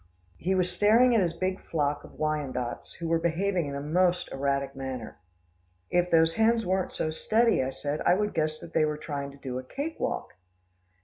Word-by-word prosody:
He 190 Hz, +3 st, 0 dB
was 180 Hz, -1 st, +1 dB
staring 225 Hz, +7 st, +5 dB
at 225 Hz, -, +4 dB
his 170 Hz, -3 st, +1 dB
big 185 Hz, +2 st, -2 dB
flock 145 Hz, -2 st, -1 dB
of -, -, -14 dB
Wyandottes 140 Hz, -6 st, -2 dB
who 170 Hz, -, -5 dB
were 165 Hz, 0 st, +2 dB
behaving 175 Hz, 0 st, 0 dB
in 140 Hz, -, -4 dB
a -, -, -2 dB
most 180 Hz, +4 st, +1 dB
erratic 140 Hz, 0 st, -1 dB
manner. 130 Hz, -4 st, -6 dB, 0.7 s
"If 175 Hz, 0 st, +2 dB
those 165 Hz, -1 st, +4 dB
hens 225 Hz, +1 st, +3 dB
weren't 185 Hz, +1 st, 0 dB
so 155 Hz, -, -2 dB
steady," 225 Hz, -, +2 dB
I 130 Hz, -, -1 dB
said, 145 Hz, +3 st, -3 dB
"I 175 Hz, -, +4 dB
would 210 Hz, +1 st, -1 dB
guess 155 Hz, -1 st, 0 dB
that 170 Hz, -, -11 dB
they 160 Hz, -, +3 dB
are 150 Hz, -1 st, +1 dB
trying 145 Hz, -2 st, -4 dB
to 140 Hz, -, -13 dB
do 130 Hz, -2 st, -4 dB
a -, -, -7 dB
cake 285 Hz, -, -5 dB
walk." -, -, -2 dB
165 Hz, 200 wpm, -28 LUFS, 140-185 Hz, 0.7 s, staring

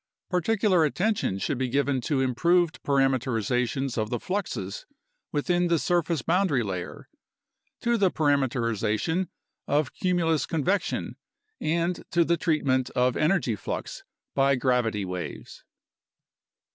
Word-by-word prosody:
Particular 185 Hz, -1 st, +2 dB
attention 180 Hz, -, 0 dB
should 125 Hz, +6 st, -2 dB
be 130 Hz, -1 st, 0 dB
given 140 Hz, 0 st, +1 dB
to 140 Hz, 0 st, 0 dB
improved 170 Hz, +7 st, +2 dB
parameterizations 130 Hz, -1 st, 0 dB
of 110 Hz, 0 st, -1 dB
the 120 Hz, -, -2 dB
fluxes 205 Hz, -, -4 dB, 0.4 s
within 175 Hz, +4 st, +1 dB
the 170 Hz, -1 st, +3 dB
surface 170 Hz, -3 st, 0 dB
boundary 170 Hz, -8 st, +2 dB
layer, 95 Hz, -4 st, -5 dB, 0.7 s
to 235 Hz, 0 st, +2 dB
the 195 Hz, -3 st, +3 dB
parameterization 135 Hz, -, 0 dB, 0.4 s
of 145 Hz, -1 st, +1 dB
cumulus 165 Hz, -6 st, +1 dB
convection, 170 Hz, +5 st, -1 dB, 0.4 s
and 170 Hz, +3 st, -1 dB
to 170 Hz, -1 st, +3 dB
the 170 Hz, -, +3 dB
treatment 140 Hz, -6 st, +1 dB
of 125 Hz, 0 st, +2 dB
energy 155 Hz, -, +1 dB
flux -, -, -5 dB, 0.3 s
by 140 Hz, 0 st, +3 dB
gravity 120 Hz, -6 st, +1 dB
waves. 90 Hz, -5 st, -6 dB
145 Hz, 115 wpm, -26 LUFS, 125-175 Hz, 0.7 s, the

